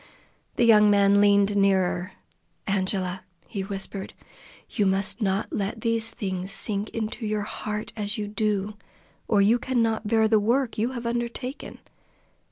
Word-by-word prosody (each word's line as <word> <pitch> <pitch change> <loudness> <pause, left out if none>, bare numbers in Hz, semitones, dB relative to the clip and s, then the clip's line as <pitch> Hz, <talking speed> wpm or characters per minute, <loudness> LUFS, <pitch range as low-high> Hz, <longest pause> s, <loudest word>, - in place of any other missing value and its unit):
The - - +2
young 210 -2 +6
man 200 0 +4
leaned 200 0 +4
nearer. 190 -2 +1 0.5
"Angela," 190 -2 -1 0.2
he 200 -4 -5
whispered. 195 0 -5 0.5
"You 205 - 0
must 195 +4 +2
not 195 0 -1
let 205 +2 -3
these 230 0 +1
things 190 -5 -4
sink 205 +1 -1
into 225 +1 -4
your 210 -1 -1
heart 210 0 -5
as 210 +1 -4
you 210 -1 -3
do, 210 -1 -1 0.5
or 205 -2 +3
you 225 +4 +4
cannot 230 -4 0
bear 220 0 +3
the 220 -1 +4
work 235 +4 0
you 240 +4 0
have 240 -2 -6
undertaken. 240 +3 -4
210 Hz, 145 wpm, -25 LUFS, 195-225 Hz, 0.5 s, young